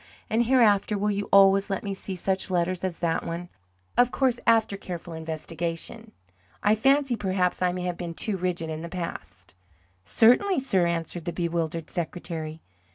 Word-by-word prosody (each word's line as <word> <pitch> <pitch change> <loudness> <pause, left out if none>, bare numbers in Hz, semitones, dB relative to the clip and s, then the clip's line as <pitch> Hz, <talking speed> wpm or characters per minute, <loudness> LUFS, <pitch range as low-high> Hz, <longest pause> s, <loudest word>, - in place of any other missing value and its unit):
And 230 +2 +3
hereafter 215 -5 +4
will 210 +1 +1
you 200 0 -3
always 195 0 +6
let 195 - -2
me 200 - -3
see 195 0 -6
such 190 +2 -1
letters 180 0 0
as 185 -3 -2
that 165 -1 0
one 170 +1 -5 0.5
of 245 0 +5
course 255 -3 +1
after 225 -3 +4
careful 175 -3 -7
investigation? 165 +6 -4 0.5
I 205 - +5
fancy 270 +3 +3
perhaps 185 -4 0
I 180 -1 +3
may 180 0 -4
have 180 -1 -2
been 170 -2 -5
too 210 +3 -1
rigid 175 -3 -2
in 155 0 -5
the 170 - -6
past." 165 - -7 0.5
"Certainly, 250 - +4
sir," 190 -9 +2
answered 170 0 -3
the 175 - -2
bewildered 165 -1 -2
secretary. 165 -2 -5
185 Hz, 165 wpm, -26 LUFS, 170-210 Hz, 0.5 s, always